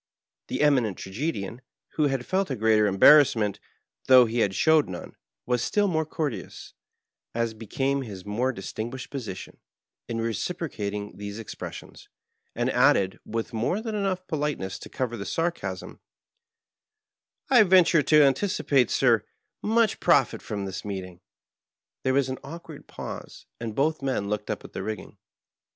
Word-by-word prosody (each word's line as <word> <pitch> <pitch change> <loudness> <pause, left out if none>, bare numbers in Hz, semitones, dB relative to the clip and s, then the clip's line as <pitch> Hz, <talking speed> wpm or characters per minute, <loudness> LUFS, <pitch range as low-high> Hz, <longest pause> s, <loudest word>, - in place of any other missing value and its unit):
The - - -2
Eminent 130 -10 +3
Tragedian, 115 +1 -4 0.3
who 150 -2 +1
had 135 -3 -2
felt 190 -1 0
a 135 - -1
greater 110 -1 +3
embarrassment, 105 0 +5 0.5
though 130 -1 +8
he 115 +1 -2
had 100 -4 +1
showed 160 -5 +4
none, 90 -1 -8 0.3
was 125 -1 0
still 205 -1 +1
more 160 -4 0
courteous, 150 -6 -5 0.6
as 115 -1 0
became 135 +6 -1
his 100 -7 -8
more 120 +6 0
dis 95 -6 -8
tinguished 120 +3 -5
position, 120 -9 -7 0.5
in 115 -1 -3
reciprocating 110 - -3
these 100 0 -6
expressions, 115 - -9 0.5
and - - 0
added, 95 -1 +3
with 115 +1 -3
more 120 - 0
than 220 0 -4
enough 195 -3 -1
politeness 150 - -3
to - - -10
cover 125 -2 -3
the 100 - -5
sarcasm, 170 +9 -3 1.5
^'I 230 -6 +7
venture 180 -3 +6
to 150 +1 +5
anticipate, 140 - +2
sir, 115 -5 +3 0.4
much 225 0 +2
profit - - +3
from 100 -2 -4
this 95 -1 -5
meeting." 95 -3 -6 0.8
There 130 0 +1
was 140 -1 +3
an 130 0 -4
awkward 160 0 -10
pause, - - -8
and 115 -2 -5
both 155 +3 +1
men 130 -7 -1
looked 105 0 -3
up - - -3
at - - -12
the - - -4
rigging. 110 -1 -6
125 Hz, 145 wpm, -26 LUFS, 105-155 Hz, 1.5 s, though